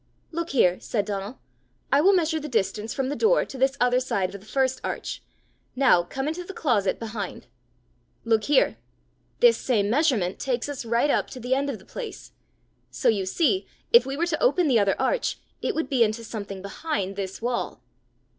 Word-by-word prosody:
"Look 335 +1 -3
here," 185 -9 +3
said 205 -4 -2
Donal; 200 +4 -4 0.5
"I 280 - +5
will 390 +5 +5
measure 320 -2 +1
the 305 - -6
distance 215 -1 -1
from 270 -2 -2
the 290 - -2
door 470 +6 +3
to - - -10
the 265 +1 +2
other 250 0 +3
side 200 -8 -1
of 200 - -8
this 215 - -17
first 260 +1 0
arch. - - -4 0.5
Now 255 -9 +5
come 270 +11 -4
into 325 +4 -3
the 380 +1 -9
closet 215 -10 +1
behind. 220 -3 -5 0.8
Look 225 -2 +2
here! 285 -2 +3 0.6
This 480 -1 +6
same 210 -5 +1
measurement 245 - +1
takes 255 -2 -1
us 285 -4 -5
right 235 +5 +2
up - - 0
to 255 - -8
the 250 +2 -1
end 280 +2 0
of 260 - -3
the 190 - -18
place! 465 -4 -8 0.6
So 255 - +1
you 200 -4 +1
see 350 - +1 0.3
if 470 - +9
we 270 +1 -3
were 340 - +1
to 335 -3 -2
open 365 -9 +3
the 245 -5 +4
other 200 -1 +1
arch, - - 0 0.2
it 455 - -1
would 320 - -1
be 260 -5 +3
into 220 +1 -1
something 200 -4 -6
behind 200 -3 -3
this 195 -1 -5
wall." 240 +1 -3
255 Hz, 195 wpm, -25 LUFS, 210-300 Hz, 0.8 s, if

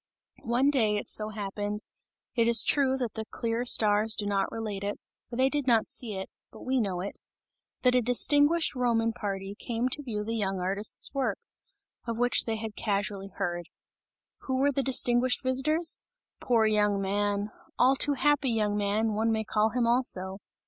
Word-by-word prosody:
One 255 +4 +2
day, 220 -7 +1
it - - -5
so 215 0 -2
happened 205 0 -5 0.5
it 230 -2 +2
is 235 0 +7
true, 265 -2 +2
that 245 -4 -3
the 220 - -5
clear 230 0 -2
stars 215 -1 +5
do 205 - -3
not 200 -1 -1
relate 210 -3 -5
it, 205 +1 -4 0.3
for 235 - -7
they 260 +2 +3
did 285 -1 -2
not 230 -3 +3
see 225 -5 -4
it, 190 0 -5 0.2
but - - -13
we 260 -1 0
know 185 -4 -2
it 200 - -7 0.6
that 250 -1 +4
a 250 - +3
distinguished 290 +7 +3
Roman 230 -3 0
party, 195 -2 -5
came 235 +3 -3
to 290 - 0
view 220 -6 -4
the 225 +2 -4
young 195 -3 -2
artist's 195 +7 -1
work, 275 -2 -1 0.7
of 230 -1 -3
which 245 +1 +3
they 225 - -2
had 220 -1 -6
casually 200 -2 -3
heard. 175 -3 -4 0.8
Who 260 - -1
were 280 +2 +2
the 275 - 0
distinguished 250 -1 +3
visitors? 305 +6 +1 0.4
Poor 230 -3 +2
young 210 -2 +2
man! 205 +1 -1 0.3
All 260 +2 +4
too 285 +1 +2
happy 285 0 +1
young 210 -3 0
man, 210 +2 0
one 220 +2 0
may 220 0 -1
call 215 0 +1
him 245 +1 0
also. 200 -6 0
225 Hz, 180 wpm, -28 LUFS, 205-255 Hz, 0.8 s, is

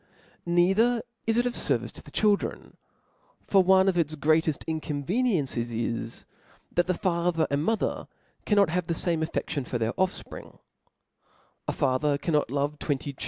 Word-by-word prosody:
"Neither 195 +8 +3 0.2
is 225 0 +2
it 240 - +3
of 245 - 0
ferviefe 120 - -1
to - - -8
the - - -14
childf 205 +6 +3
en^ - - -7 0.7
for 195 - +5
one 190 +1 +5
of 180 -2 +2
its 155 -1 0
greateft 155 +1 +1
incoaveniencies 155 - -1
is, 115 0 -3 0.5
that 175 0 +1
the 185 - +1
father 170 -2 +1
and 140 +1 +1
mother 225 +5 -1 0.4
cannot 200 -5 +3
h*ve 180 0 -1
the 170 - -1
fame 165 -1 0
affeftion 155 -2 -2
rfbr 125 - -3
their 115 -1 -1
offspring; 185 0 -3 1.1
a - - +1
father 140 +3 +1
canrlot 150 -3 0
love 145 +2 -1
twenty 140 -1 -2
165 Hz, 155 wpm, -27 LUFS, 145-190 Hz, 1.1 s, for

